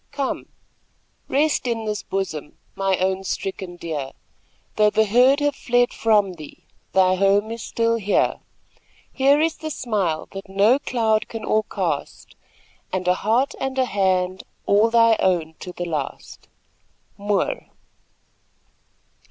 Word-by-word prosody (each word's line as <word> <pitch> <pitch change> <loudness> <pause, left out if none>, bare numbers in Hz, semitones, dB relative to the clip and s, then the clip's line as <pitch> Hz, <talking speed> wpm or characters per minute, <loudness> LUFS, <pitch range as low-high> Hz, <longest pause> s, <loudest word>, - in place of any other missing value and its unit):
Come, 280 -2 -3 0.8
rest 290 -2 +1
in 230 -2 -2
this 210 -1 -2
bosom, 155 -7 -4 0.2
my 195 -1 0
own 190 +1 0
stricken 190 -2 -4
deer, 155 -6 -5 0.6
Though 210 0 +4
the 220 +1 +2
herd 250 +7 +4
have 290 -1 +1
fled 245 -2 +1
from 210 -4 +2
thee, 155 -4 -12 0.3
thy 185 -1 +4
home 200 +3 +2
is 230 0 -5
still 230 +1 0
here: 205 -2 +1 0.7
Here 275 +2 +4
is 320 +1 +1
the 315 - -5
smile 200 - -2
that 195 0 -8
no 205 +7 +4
cloud 225 -5 0
can 225 -1 -6
o'ercast, 215 0 -2 0.6
And 185 -1 -2
a 180 - +5
heart 230 +9 +1
and 265 0 -3
a 260 - +3
hand 185 -3 0 0.2
all 210 +3 +4
thy 230 -1 +5
own 170 -4 +1
to 180 - -7
the 175 0 -5
last. 155 -5 -5 0.7
Moore. 200 -1 -1
210 Hz, 135 wpm, -22 LUFS, 185-235 Hz, 0.8 s, a